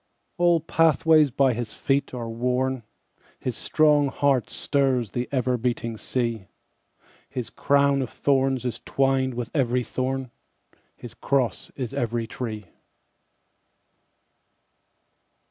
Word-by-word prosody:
All 175 -2 +4
pathways 160 -1 +4
by 135 0 +2
his 115 -1 -5
feet 140 0 0
are 120 -2 -5
worn, 125 +2 -1 0.6
His 125 - -4
strong 150 0 +3
heart 135 -2 +1
stirs 130 -6 0
the 125 0 -3
ever 125 -2 +1
beating 115 -1 -2
sea, 115 -3 -2 0.8
His 125 -3 -5
crown 140 -1 +2
of 130 - -3
thorns 135 -2 +1
is 125 - -3
twined 135 -2 +1
with 120 -1 -4
every 125 -3 +1
thorn, 130 0 -3 0.6
His 120 - -10
cross 135 -4 -1
is 125 -4 -4
every 115 -1 -1
tree. 110 -3 -6
130 Hz, 110 wpm, -25 LUFS, 120-140 Hz, 0.8 s, All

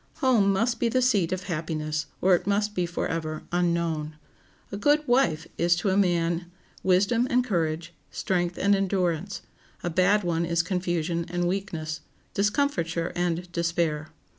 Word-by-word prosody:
Home 230 -7 +3
must 230 +5 +1
be 235 - +2
the 255 +3 +2
seat 210 -10 +2
of 185 0 -2
happiness 155 -2 -3
or 185 0 +5
it 175 - +1
must 205 +1 +1
be 180 -3 0
forever 160 -2 -3
unknown. 170 -3 0 0.6
A - - -4
good 290 +8 +2
wife 175 -12 +2
is 170 0 +4
to 185 +3 0
a - - +1
man 175 -2 +1 0.3
wisdom 200 +6 +3
and 250 0 +3
courage, 170 -6 -1 0.2
strength 175 -2 -1
and 200 +1 +3
endurance; 190 -1 -1 0.4
a 175 - -1
bad 195 +5 +3
one 170 -1 0
is 170 0 +1
confusion 175 -2 -1
and 175 0 0
weakness, 165 -5 -3 0.3
discomfiture 195 - 0
and 175 0 -1
despair. 170 -3 -1
175 Hz, 150 wpm, -26 LUFS, 165-200 Hz, 0.6 s, or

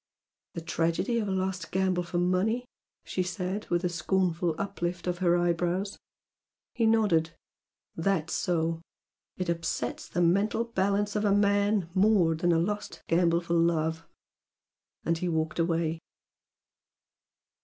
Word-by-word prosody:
"The 165 - -4
tragedy 170 +8 0
of 210 - -2
a - - -1
lost 185 -2 -2
gamble 185 -1 +1
for 175 0 -4
money!" 185 +7 +1 0.4
she 185 - -2
said, 185 +2 -3
with 175 +1 +1
a - - +2
scornful 175 0 0
uplift 180 -3 -3
of 175 -1 -2
her 175 -2 +3
eyebrows. 175 +3 0 0.7
He 230 -2 +2
nodded. 180 -8 +2 0.6
"That's 165 -2 0
so! 165 -1 0 0.6
It 185 - -2
upsets 170 -1 -2
the 175 - -1
mental 200 +6 +2
balance 205 -2 0
of 210 - 0
a 205 - +3
man 205 -1 +2
more 190 -4 +4
than 175 +2 +1
a 165 - +3
lost 205 +5 -3
gamble 170 0 +3
for 170 0 -3
love!" 165 -1 +1 1.0
And 165 0 +1
he 180 - -1
walked 160 0 -1
away. 165 -1 0
180 Hz, 135 wpm, -28 LUFS, 165-200 Hz, 1.0 s, more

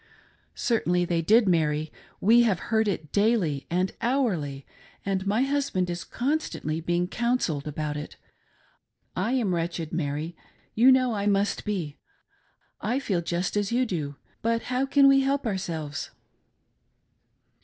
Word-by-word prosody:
"Certainly 180 -7 +1
they 170 -1 0
did, 215 +6 +4
Mary 155 -3 +1
^ - - -22 0.2
'We 230 +5 +6
have 220 -6 +3 0.2
heard 220 0 +3
it 160 -7 -3
daily 200 - +1
and 180 +2 0
hourly, 190 - 0 0.4
and 195 -1 -1
my 215 +5 +2
husband 270 -11 0
is 175 0 -4
constantly 245 - -2
being 175 +1 0
counselled 235 - -1
aboat 150 0 -3
ft. 150 - -7 1.0
I 220 +7 0
am 225 -8 +1
wretched, 170 -1 -3
Mary, 155 +1 -2 0.4
you 245 +4 +6
know 255 -2 +3
I 205 -1 -1
must 200 0 +1
be; 180 -9 -3 0.8
I 235 +5 0
feel 200 -10 -1
just 175 +3 -2
a$ - - +3
ydu 235 +5 +1
do, 150 - -3 0.3
but 230 0 0
how 260 +2 +1
can 275 0 +5
we 275 0 +6
help 275 0 0
ourselves?" 170 -8 -3
195 Hz, 145 wpm, -26 LUFS, 165-235 Hz, 1.0 s, We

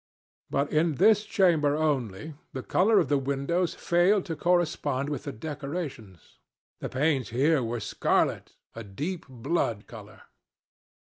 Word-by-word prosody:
But 140 +1 -1
in 155 0 +2
this 215 - +4
chamber 160 -9 +3
only, 145 -4 -1 0.2
the 130 - -5
color 210 +4 +3
of 170 - +1
the 145 +1 +2
windows 140 +6 -1
failed 180 +3 +2
to 165 - -4
correspond 155 -6 0
with 145 -4 -4
the 140 - -3
decorations. 140 - -7 0.4
The - - -5
panes 135 -1 0
here 140 +5 +2
were 120 0 -3
scarlet—a 115 +1 -2
deep 150 - -5
blood 120 -4 -2
color. 105 -2 -12
145 Hz, 130 wpm, -27 LUFS, 125-170 Hz, 0.4 s, this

